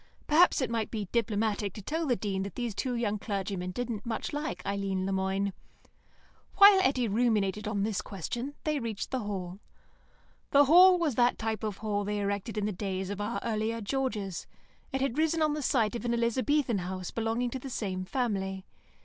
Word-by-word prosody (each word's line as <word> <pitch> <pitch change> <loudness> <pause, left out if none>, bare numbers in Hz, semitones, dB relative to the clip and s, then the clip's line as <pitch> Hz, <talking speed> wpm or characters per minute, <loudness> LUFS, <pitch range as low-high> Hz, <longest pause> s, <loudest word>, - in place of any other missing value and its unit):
Perhaps 320 0 +5
it 255 - -1
might 225 -2 -1
be 215 -3 -3
diplomatic 215 -3 0
to 210 - -8
tell 320 - -2
the 250 - +3
Dean 195 -4 -2
that 195 +1 -5
these 240 -3 -2
two 250 +4 -2
young 215 -3 -1
clergymen 195 -3 -3
didn't 225 +2 -4
much 235 +5 -3
like 295 +1 -4
Eileen 195 -1 -1
Le 195 - -1
Moine. 190 +1 0 1.0
While 400 -1 +9
Eddy 260 -7 +2
ruminated 210 -2 +1
on 200 -2 0
this 210 -2 -1
question, 240 - -5
they 305 -2 0
reached 225 -5 -4
the 260 - 0
Hall. 195 -4 -5 0.9
The 285 +1 +6
Hall 360 +5 +8
was 330 -5 0
that 240 +1 +3
type 220 -1 -3
of 210 -3 -3
hall 210 -2 -1
they 210 +1 -2
erected 200 +2 -2
in 210 - 0
the 210 - 0
days 190 0 -3
of 200 0 -4
our 215 +3 -2
earlier 225 0 -1
Georges; 215 -5 -2 0.4
it 270 -1 -2
had 275 +1 0
risen 320 0 +2
on 305 -1 +2
the 300 - -3
site 240 -4 +1
of 235 - -4
an 235 -1 0
Elizabethan 235 0 +1
house 185 0 -5
belonging 230 +2 -1
to 260 - -4
the 270 - -7
same 190 -6 -3
family. 195 -4 -2
220 Hz, 190 wpm, -29 LUFS, 200-255 Hz, 1.0 s, While